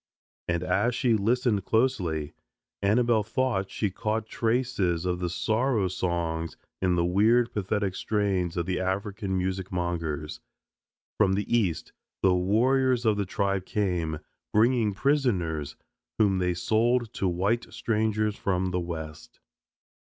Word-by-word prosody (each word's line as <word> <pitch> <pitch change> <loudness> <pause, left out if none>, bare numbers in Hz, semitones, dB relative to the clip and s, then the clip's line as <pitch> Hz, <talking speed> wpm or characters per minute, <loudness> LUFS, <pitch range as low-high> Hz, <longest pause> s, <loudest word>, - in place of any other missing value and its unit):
And 85 0 0
as 100 +7 +1
she 125 -4 +2
listened 110 -1 +1
closely, 95 - 0 0.5
Annabelle 110 +2 +3
thought 110 -3 -1
she 105 -3 -2
caught 110 +3 -2
traces 110 -8 0
of 90 -1 -1
the 90 -1 -1
sorrow 110 +3 +1
songs 85 -2 -2 0.2
in 90 -2 +2
the 85 0 +2
weird 110 +7 +3
pathetic 105 -1 -1
strains 95 -4 -1
of 85 - 0
the 90 0 -1
African 95 +1 -2
music 95 0 -2
mongers. 85 -4 -3 0.8
From 100 -3 +4
the 105 +4 0
East 95 -9 0 0.3
the 95 -1 +5
warriors 120 +7 +2
of 110 -2 +4
the 100 -2 -2
tribe 100 -1 -1
came, 90 -6 -1 0.3
bringing 110 -2 +3
prisoners, 100 - 0 0.4
whom 100 -3 +3
they 90 -1 0
sold 115 +5 +1
to 95 - -1
white 100 +7 0
strangers 110 -2 0
from 95 -1 -1
the 90 - 0
West. 80 -3 -7
100 Hz, 130 wpm, -27 LUFS, 90-115 Hz, 0.8 s, the